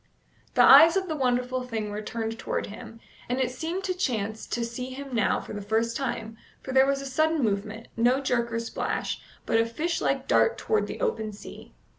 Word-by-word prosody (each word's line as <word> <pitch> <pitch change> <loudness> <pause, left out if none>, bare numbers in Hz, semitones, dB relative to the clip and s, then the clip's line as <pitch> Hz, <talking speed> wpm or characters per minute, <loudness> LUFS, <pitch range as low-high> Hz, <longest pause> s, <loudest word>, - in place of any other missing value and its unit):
The - - +6
eyes 325 +6 +9
of 380 -1 -1
the 315 - -2
wonderful 250 -1 0
thing 225 -4 -4
were 210 +1 -4
turned 225 +1 -4
toward - - -2
him, 225 +2 -10 0.3
and 250 +1 0
it 255 -1 +1
seemed 330 +9 -4
to 375 -1 -1
chance 220 - -2
to 235 -1 -2
see 250 +2 -5
him 270 +1 -8
now 225 -5 +2
for - - -9
the 205 - -5
first 225 +3 0
time, 225 -4 -3 0.3
for 265 - -5
there 265 +1 +5
was 275 0 +1
a - - -7
sudden 310 +2 +1
movement, 215 +2 -2
no 245 +3 +3
jerk 240 -3 0
or 230 - -1
splash, 230 - -3 0.2
but 225 - +2
a 225 - +3
fish 325 +9 -2
like - - 0
dart 455 - +3
toward 440 - 0
the - - -7
open 220 - -1
sea. 205 - -12
245 Hz, 210 wpm, -27 LUFS, 225-275 Hz, 0.3 s, eyes